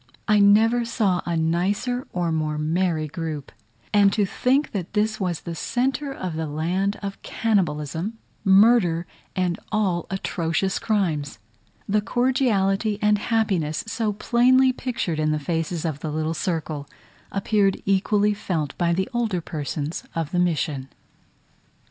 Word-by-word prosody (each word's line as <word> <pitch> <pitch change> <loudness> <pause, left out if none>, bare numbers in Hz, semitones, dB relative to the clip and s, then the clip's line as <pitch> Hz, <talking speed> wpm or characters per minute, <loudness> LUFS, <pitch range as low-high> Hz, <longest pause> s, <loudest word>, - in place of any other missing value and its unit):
I 210 -1 +4
never 220 +4 +5
saw 215 -6 +1
a 170 -1 0
nicer 195 +10 0
or 175 -2 -1
more 155 -1 -1
merry 160 0 0
group; 155 -3 -5 0.4
and 200 -1 +5
to 210 - +2
think 265 +9 +1
that 190 -2 -4
this 215 +1 +1
was 180 -5 -2
in 170 - -4
the - - -5
centre 260 - -1
of 185 -10 -4
the 160 0 -2
land 180 +7 -1
of 195 0 -5
cannibalism, 175 -1 -1 0.3
murder, 195 -4 +5 0.3
and 180 -2 0
all 190 -6 0
atrocious 190 -1 -1
crimes! 180 -11 -1 0.5
The 210 +1 +2
cordiality 215 -4 +1
and 210 -1 +3
happiness 195 -10 0
so 225 -1 -1
plainly 255 +4 +4
pictured 230 -11 -3
in 155 0 +1
the 155 - +1
faces 165 +2 -2
of 155 -3 -2
the 155 - -4
little 155 +1 -1
circle, 160 -4 -3 0.4
appeared 200 -1 +2
equally 205 +2 +2
felt 160 -8 -3
by 170 -1 +2
the 190 +4 0
older 225 -6 0
persons 150 -1 -4
of 165 -3 -2
the 180 - +1
mission. 150 -6 0
190 Hz, 140 wpm, -24 LUFS, 160-215 Hz, 0.5 s, never